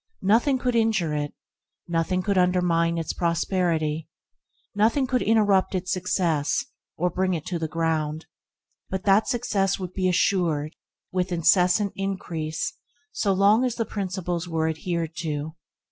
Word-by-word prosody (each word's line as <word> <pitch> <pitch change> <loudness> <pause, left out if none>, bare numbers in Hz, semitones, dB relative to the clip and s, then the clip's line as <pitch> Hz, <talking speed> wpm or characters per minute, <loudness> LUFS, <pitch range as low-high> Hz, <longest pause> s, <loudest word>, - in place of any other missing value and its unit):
Nothing 235 +8 +3
could 250 -1 -1
injure 220 -9 +2
it; 145 -1 -3 0.5
nothing 175 +2 0
could 200 0 0
undermine 180 -2 +2
its 165 -1 -2
prosperity, 165 -3 0 0.7
nothing 225 +6 +2
could 255 -1 0
interrupt 205 -4 +3
its 180 0 -2
success, 170 -5 0 0.3
or 180 +2 0
bring 185 +1 0
it 155 - -5
to 175 -2 -3
the 160 - -2
ground; 160 -1 -1 0.6
but 190 -1 -3
that 200 +2 +4
success 205 -5 0
would 185 -1 -6
be 185 -1 +1
assured 170 -5 +1 0.4
with 185 0 -1
incessant 180 +4 +3
increase 165 -5 -3 0.4
so 200 - 0
long 200 +5 +4
as 250 -2 0
the 230 - -1
principles 185 -4 -3
were 160 -1 0
adhered 165 0 -3
to. 155 -1 -3
180 Hz, 140 wpm, -25 LUFS, 165-195 Hz, 0.7 s, that